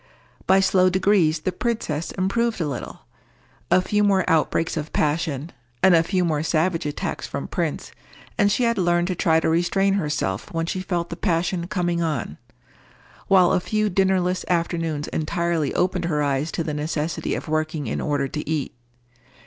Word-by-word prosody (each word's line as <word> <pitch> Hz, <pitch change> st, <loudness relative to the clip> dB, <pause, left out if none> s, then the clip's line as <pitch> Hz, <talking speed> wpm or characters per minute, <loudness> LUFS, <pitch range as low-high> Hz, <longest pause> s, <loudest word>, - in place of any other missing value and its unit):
By 190 Hz, +1 st, +5 dB
slow 185 Hz, -1 st, +4 dB
degrees 185 Hz, -4 st, +2 dB
the 185 Hz, -, -1 dB
princess 180 Hz, -7 st, -2 dB
improved 220 Hz, +4 st, 0 dB
a 165 Hz, -, 0 dB
little. 135 Hz, -4 st, -6 dB, 0.7 s
A 185 Hz, -, +4 dB
few 210 Hz, +2 st, +1 dB
more 195 Hz, -2 st, +2 dB
outbreaks 165 Hz, 0 st, +1 dB
of 155 Hz, -1 st, -4 dB
passion, 155 Hz, 0 st, -1 dB, 0.3 s
and 190 Hz, -1 st, +7 dB
a 165 Hz, -, +6 dB
few 180 Hz, +1 st, 0 dB
more 155 Hz, -3 st, 0 dB
savage 165 Hz, +1 st, 0 dB
attacks 145 Hz, -, -4 dB
from -, -, -5 dB
Prince, -, -, -3 dB, 0.4 s
and 205 Hz, -1 st, +3 dB
she 245 Hz, -, +1 dB
had 235 Hz, -3 st, +1 dB
learned 175 Hz, 0 st, +2 dB
to 185 Hz, -, -1 dB
try 160 Hz, -1 st, +3 dB
to -, -, -1 dB
restrain 175 Hz, +4 st, +2 dB
herself 150 Hz, -, -2 dB
when 165 Hz, -1 st, -1 dB
she 185 Hz, +2 st, -3 dB
felt 175 Hz, -2 st, -3 dB
the -, -, -3 dB
passion 175 Hz, -1 st, -1 dB
coming 175 Hz, -3 st, -1 dB
on; 150 Hz, -, -2 dB, 0.9 s
while 185 Hz, -2 st, +5 dB
a 190 Hz, -, +3 dB
few 215 Hz, +3 st, -1 dB
dinnerless 185 Hz, -1 st, +1 dB
afternoons 165 Hz, -3 st, -1 dB
entirely 165 Hz, -1 st, -1 dB
opened 180 Hz, -1 st, 0 dB
her 150 Hz, -3 st, 0 dB
eyes 140 Hz, +2 st, 0 dB
to 165 Hz, -, -1 dB
the 155 Hz, -, -3 dB
necessity 150 Hz, +1 st, -2 dB
of -, -, -6 dB
working 155 Hz, -1 st, -1 dB
in 110 Hz, -, -3 dB
order 145 Hz, -2 st, 0 dB
to 150 Hz, +3 st, -5 dB
eat. 155 Hz, -3 st, -2 dB
170 Hz, 175 wpm, -23 LUFS, 155-185 Hz, 0.9 s, and